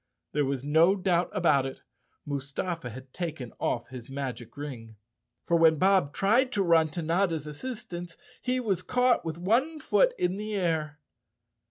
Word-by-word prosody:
There 145 -1 +1
was 135 -1 -2
no 160 +6 +4
doubt 180 -2 +1
about 150 -9 +3
it, 135 - -9 0.4
Mustafa 145 +2 -3
had 130 +2 -11
taken 160 -9 -5
off 120 - -1
his 125 -2 -9
magic 130 -3 -5
ring. 120 -7 -7 0.5
For 170 - +1
when 165 -1 +6
Bob 190 -4 +3
tried 235 - +3
to 200 - +2
run 165 -3 +4
to 160 +2 -5
Notta's 165 -2 +1
assistance 175 - -7 0.2
he 255 0 0
was 200 -8 0
caught 250 +3 +2
with 160 -1 -4
one 245 - +1
foot - - +3
in 180 +2 0
the 210 0 -4
air. 160 -5 -1
165 Hz, 160 wpm, -28 LUFS, 140-195 Hz, 0.5 s, when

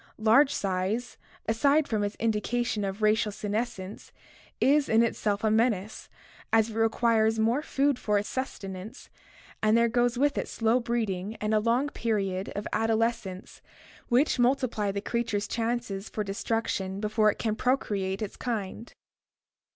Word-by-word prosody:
Large 230 +6 +5
size, 195 +5 -2 0.3
aside 280 +7 +3
from 215 -2 0
its 205 0 -2
indi 220 -2 0
cation 240 -3 -1
of 195 +2 -4
racial 215 0 +3
senescence, 210 -1 -4 0.5
is 285 +1 +3
in 225 +1 +5
itself 210 -3 -1
a 220 - +3
menace, 220 -2 0 0.4
as 225 0 +3
it - - -9
requires 225 0 +2
more 230 +6 +2
food 280 -3 0
for 210 -1 +1
its 205 - -1
sustenance 210 -3 -6 0.5
and 215 +1 +4
there 235 0 +4
goes 240 +1 +1
with 285 +1 +2
it - - -3
slow 225 +2 +1
breeding 220 -4 -2
and 215 0 -2
a 215 - +4
long 235 +6 +1
period 195 -7 -2
of 205 - -3
adolescence 225 -4 -1 0.5
which 255 +2 +3
multiply 245 -5 +1
the 200 0 -3
creature's 215 -2 -1
chances 230 -4 -2
for 215 - -3
destruction 200 -2 -2
before 215 0 +2
it - - -10
can 220 -2 -1
procreate 205 -6 -1
its 205 - -6
kind. 225 -1 -4
220 Hz, 150 wpm, -28 LUFS, 205-240 Hz, 0.5 s, Large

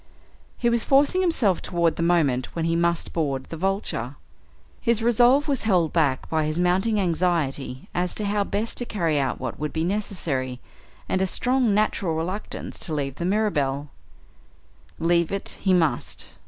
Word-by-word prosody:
He 240 - 0
was 235 -1 +2
forcing 285 +7 +3
himself 255 - +2
toward 170 -3 0
the - - -4
moment 155 -7 +1
when 165 -1 -1
he 165 0 +1
must 170 0 0
board 140 -5 -1
the - - -5
Vulture. 165 - -2 0.7
His 235 -2 +1
resolve 245 +5 +4
was 280 -3 0
held 180 -7 +2
back 145 -6 +1
by 160 -1 0
his 155 +1 -2
mounting 190 +5 +2
anxiety 165 -8 -1
as 180 0 -1
to 210 - -1
how 205 0 +1
best 210 +3 -2
to 245 - -2
carry 165 -10 0
out 135 -2 -1
what 130 -3 -5
would 150 0 -2
be 160 - -1
necessary, 165 - -2 0.5
and 190 - 0
a 190 - +2
strong 250 +1 +1
natural 200 -5 +1
reluctance 185 +6 -5
to 160 - -3
leave 140 -2 -3
the 170 - -3
Mirabelle. 150 -9 0 1.1
Leave 170 0 +2
it 195 0 -2
he 195 - +2
must. 160 -9 0
175 Hz, 170 wpm, -24 LUFS, 155-210 Hz, 1.1 s, resolve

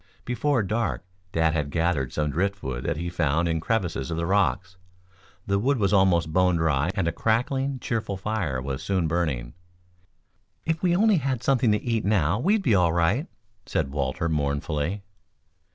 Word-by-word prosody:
Before 125 0 +1
dark 110 0 -2 0.3
Dad 80 -2 +2
had 75 -3 -1
gathered 80 -4 0
some 75 -1 -1
driftwood 80 -8 -2
that 85 -2 -1
he 85 +2 -3
found 85 -1 0
in 80 -1 0
crevices 90 - -1
of 80 - -3
the 85 - -1
rocks. 100 0 +1 0.7
The 100 0 +1
wood 135 +6 +1
was 100 -2 +1
almost 85 -5 +3
bone 90 0 +3
dry 80 -2 +1
and 95 -5 0
a - - +1
crackling, 130 - 0
cheerful 110 -5 -3
fire 95 -9 -2
was 65 +1 -4
soon 95 -1 0
burning. 75 -8 -1 1.1
"If 160 -1 -1
we 175 -2 +2
only 210 +1 +4
had 130 -4 -2
something 125 -4 +3
to 105 - -1
eat 115 -3 0
now, 100 -2 +2
we'd 200 - +2
be 120 - +3
all 90 -4 +3
right," 95 - +1 0.4
said 65 - -1
Walter 70 +2 -1
mournfully. 75 +4 -1
90 Hz, 170 wpm, -25 LUFS, 80-110 Hz, 1.1 s, only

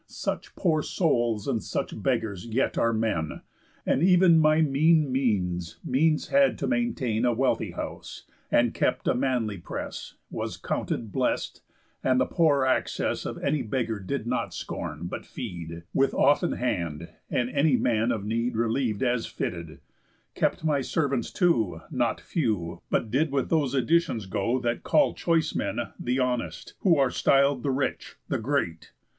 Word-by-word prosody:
Such - - -4
poor 160 -5 +1
souls, 120 - 0
and 120 -5 0
such - - -4
beggars, 115 -4 -1
yet 115 +4 0
are 115 - +2
men; 110 -9 -1 0.4
And - - +2
ev'n 180 -2 +6
my 155 0 +4
mean 155 0 +3
means 90 -10 -1
means 155 +4 +2
had 275 0 +4
to - - -2
maintain 220 - 0
A 120 -1 +3
wealthy 130 +3 0
house, - - -7 0.3
and - - +3
kept - - 0
a - - +4
manly 125 -6 -1
press, 85 - -6 0.2
Was - - -4
counted 110 -3 -3
blessed, - - -1 0.4
and 130 -1 +3
the 130 - +3
poor 145 -5 +2
access 130 - 0
Of - - -5
any 150 - +1
beggar 115 -1 -2
did 95 - -3
not - - -2
scorn, - - -5
but - - -5
feed, 85 -1 -7
With 135 0 +2
often 145 +5 +3
hand, 85 -9 -2 0.2
and 125 0 0
any 140 -2 +3
man 115 0 +1
of 105 -3 -2
need 115 +3 -1
Reliev'd 115 0 0
as 120 -2 0
fitted; 85 -2 -5 0.5
kept - - 0
my 145 -3 +2
servants, 140 -3 -1
too, 115 - +1
Not - - 0
few, 105 - -2
but 110 - 0
did 145 +4 +1
with 135 -2 0
those 145 -5 +2
additions 130 - +1
go 115 +6 0
That 120 -2 -1
call 295 - +3
choice 165 -2 +1
men - - -2 0.2
The 125 +1 -1
Honest, 120 -11 -2
who 175 -5 +4
are 135 -2 +3
styl'd 140 -1 +3
The 140 - -1
rich, 135 +1 -2
the 135 - 0
great. 110 - -2
125 Hz, 160 wpm, -27 LUFS, 110-145 Hz, 0.5 s, ev'n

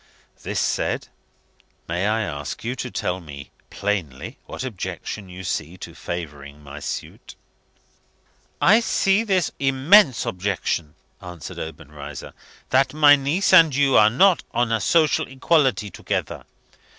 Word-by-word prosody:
This - - -3
said, - - -1 0.8
may 90 +4 -1
I 110 +1 +1
ask 75 -6 -6
you 120 +3 -3
to 125 0 -5
tell 90 -5 -3
me 70 -4 -11 0.2
plainly 95 -10 -4
what - - -6
objection 105 -3 -6
you 90 +1 -9
see 85 0 -4
to 85 -2 -9
favouring 75 -4 -7
my 70 +1 -9
suit?" - - -7 1.2
"I 215 +3 +5
see 205 -2 +1
this 190 -6 0
immense 135 - +4
objection," 90 -4 -2 0.3
answered 90 -3 -9
Obenreizer, 75 -2 -9 0.4
"that 135 +2 +2
my 145 -2 +7
niece 145 +8 0
and 165 -6 +7
you 140 -1 +3
are 105 0 +7
not 180 - +4
on 120 -1 +1
a 115 -2 0
social 155 - +2
equality 130 - +1
together. - - -4
110 Hz, 130 wpm, -22 LUFS, -, 1.2 s, my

